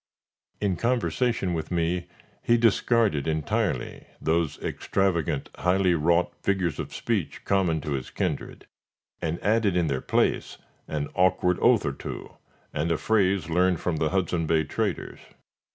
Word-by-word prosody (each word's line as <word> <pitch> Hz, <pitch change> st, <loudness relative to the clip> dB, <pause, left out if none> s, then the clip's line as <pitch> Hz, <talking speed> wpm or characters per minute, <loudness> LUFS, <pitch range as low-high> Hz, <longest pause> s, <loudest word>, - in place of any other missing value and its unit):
In 100 Hz, -4 st, 0 dB
conversation 120 Hz, -5 st, 0 dB
with 80 Hz, -2 st, -3 dB
me, 85 Hz, 0 st, -1 dB, 0.3 s
he 120 Hz, -, +3 dB
discarded 115 Hz, -, +2 dB
entirely 80 Hz, -2 st, -1 dB
those 80 Hz, -1 st, 0 dB
extravagant, 85 Hz, -7 st, -1 dB
highly 90 Hz, 0 st, +2 dB
wrought 85 Hz, +2 st, +2 dB
figures 95 Hz, -4 st, 0 dB
of -, -, -4 dB
speech -, -, -2 dB
common 90 Hz, -5 st, +1 dB
to 75 Hz, -, -5 dB
his 65 Hz, -3 st, -3 dB
kindred, -, -, -3 dB, 0.6 s
and 80 Hz, +1 st, -2 dB
added 105 Hz, -3 st, +2 dB
in 85 Hz, -, +2 dB
their 70 Hz, -4 st, -1 dB
place -, -, 0 dB, 0.3 s
an 75 Hz, -2 st, -2 dB
awkward 90 Hz, -1 st, +2 dB
oath 120 Hz, -3 st, +4 dB
or 70 Hz, -, -1 dB
two, -, -, -8 dB, 0.4 s
and 80 Hz, +3 st, -1 dB
a 85 Hz, -, +2 dB
phrase 100 Hz, -5 st, +2 dB
learned 90 Hz, +1 st, +2 dB
from 85 Hz, -3 st, -1 dB
the 75 Hz, 0 st, +1 dB
Hudson 85 Hz, -3 st, 0 dB
Bay 80 Hz, -1 st, +3 dB
traders. 75 Hz, -, -3 dB
90 Hz, 140 wpm, -26 LUFS, 80-95 Hz, 0.6 s, oath